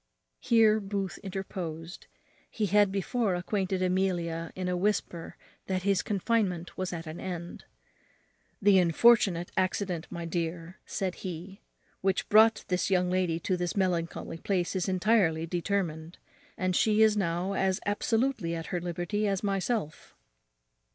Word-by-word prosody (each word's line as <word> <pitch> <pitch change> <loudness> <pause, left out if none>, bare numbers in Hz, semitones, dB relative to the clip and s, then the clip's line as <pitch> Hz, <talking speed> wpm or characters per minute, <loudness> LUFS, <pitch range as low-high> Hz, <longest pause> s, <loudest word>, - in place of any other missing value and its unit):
Here 225 -3 +4
Booth 195 -2 -4
interposed. 180 -4 -6 0.4
He 215 - -1
had 205 0 +4
before 200 +1 0
acquainted 185 +1 -1
Amelia 175 -3 0
in 185 -1 -3
a 180 - 0
whisper 180 -3 -2 0.3
that 185 -1 -1
his 195 -2 +2
confinement 195 -4 -1
was 185 -1 -3
at 170 -1 -5
an 155 +1 -7
end. 175 -2 -6 0.9
"The 200 -1 +5
unfortunate 180 0 +4
accident, 185 -2 -1
my 170 -2 -5
dear," 165 +1 -4
said 190 -2 -2
he, 185 +2 -7 0.4
"which 190 0 0
brought 220 +1 +5
this 180 +1 0
young 180 -1 +2
lady 180 -3 +1
to 185 - 0
this 175 +2 -3
melancholy 170 -3 -1
place 185 -1 -1
is 185 +1 0
entirely 185 -4 +2
determined; 170 -2 -2 0.4
and 185 -1 0
she 215 +2 +4
is 215 -1 +4
now 180 0 -1
as 190 -1 +1
absolutely 220 -3 0
at 165 -1 -5
her 175 - 0
liberty 175 +5 -2
as 195 -1 -1
myself." 195 -3 -2
185 Hz, 140 wpm, -29 LUFS, 175-200 Hz, 0.9 s, The